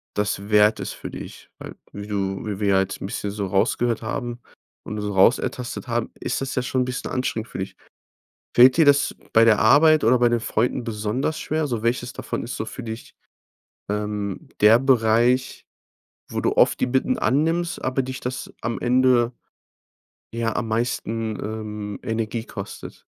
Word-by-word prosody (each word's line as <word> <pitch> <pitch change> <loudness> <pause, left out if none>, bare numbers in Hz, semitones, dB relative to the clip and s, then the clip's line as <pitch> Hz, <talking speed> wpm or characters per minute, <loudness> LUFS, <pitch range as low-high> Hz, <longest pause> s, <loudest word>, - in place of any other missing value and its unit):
das 100 0 -2
wert 105 0 +4
ist - - -4
für - - -8
dich. - - -10
Weil - - -9 0.2
wie 100 0 -7
du 95 -1 -2
wie 105 -2 -4
wir 105 -1 +1
ja 95 -1 +4
jetzt 95 0 -4
'n - - -4
bisschen 100 0 -4
so 100 -1 -3
rausgehört 115 +4 +1
haben 120 +2 -4 0.5
und 105 0 -5
so 105 0 -3
rausertastet 120 +5 +1
haben, 115 -1 -2
ist - - -2
das 135 -1 -3
ja 125 - +1
schon 130 +1 0
'n - - -3
bisschen 125 0 -4
anstrengend 120 -3 -2
für - - -7
dich. 95 - -5 0.8
Fällt 125 +3 +7
dir 160 - +6
das 145 0 +4 0.2
bei 115 0 +6
der 110 -2 +5
Arbeit 150 +6 +5
oder 120 +2 +4
bei 120 0 +4
den 120 0 +1
Freunden 120 +2 0
besonders 115 +6 -2
schwer? 155 0 -1
So, 120 -5 -3
welches 120 +1 -1
davon 130 - -4
ist 120 - -5
so 110 - -3
für 125 - -8
dich, 110 +1 -8 0.7
ähm, 105 -1 -3
der 110 +3 +7
Bereich, 125 0 +2 0.6
wo - - -3
du - - +1
oft - - +4
die - - +1
Bitten 135 - +1
annimmst, 165 +4 0
aber 130 +1 0
dich 130 0 -6
das 125 0 -5
am 115 +1 -3
Ende 125 -1 +3 1.0
ja, 115 -1 -1
am 115 - -2
meisten, 115 -1 -2
ähm, 105 -1 -5
Energie 115 -1 -3
kostet? - - -9
115 Hz, 180 wpm, -23 LUFS, 105-125 Hz, 1.0 s, Fällt